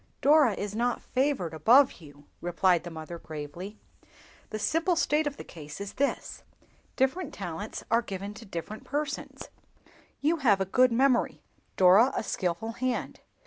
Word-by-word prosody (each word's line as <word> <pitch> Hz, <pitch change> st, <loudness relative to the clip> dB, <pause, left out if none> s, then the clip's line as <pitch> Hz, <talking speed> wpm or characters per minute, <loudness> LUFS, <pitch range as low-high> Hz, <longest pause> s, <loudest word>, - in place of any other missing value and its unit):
"Dora 290 Hz, -5 st, +5 dB
is 205 Hz, +1 st, -4 dB
not 240 Hz, +2 st, 0 dB
favored 255 Hz, -, 0 dB
above 235 Hz, -, +4 dB
you," 145 Hz, -2 st, -15 dB, 0.2 s
replied 175 Hz, 0 st, +2 dB
the 175 Hz, -, -6 dB
mother, 165 Hz, +1 st, -8 dB
gravely. 160 Hz, +8 st, -8 dB, 0.7 s
"The 215 Hz, -, -4 dB
simple 330 Hz, -, +1 dB
state 310 Hz, -2 st, +1 dB
of 285 Hz, -, -4 dB
the -, -, -7 dB
case 150 Hz, -1 st, -10 dB
is 200 Hz, 0 st, -6 dB
this—different 280 Hz, +2 st, -3 dB
talents -, -, -6 dB
are 230 Hz, +1 st, +4 dB
given 200 Hz, -1 st, -6 dB
to 220 Hz, +2 st, -11 dB
different 190 Hz, +4 st, -6 dB
persons. 290 Hz, -1 st, -4 dB, 0.7 s
You 320 Hz, +4 st, +2 dB
have 225 Hz, -10 st, +3 dB
a 190 Hz, -, +1 dB
good 255 Hz, +6 st, +4 dB
memory, 255 Hz, +1 st, +2 dB, 0.3 s
Dora 195 Hz, +7 st, +6 dB
a -, -, -1 dB
skilful 185 Hz, +2 st, -2 dB
hand. 250 Hz, +2 st, -3 dB
220 Hz, 145 wpm, -28 LUFS, 175-270 Hz, 0.7 s, Dora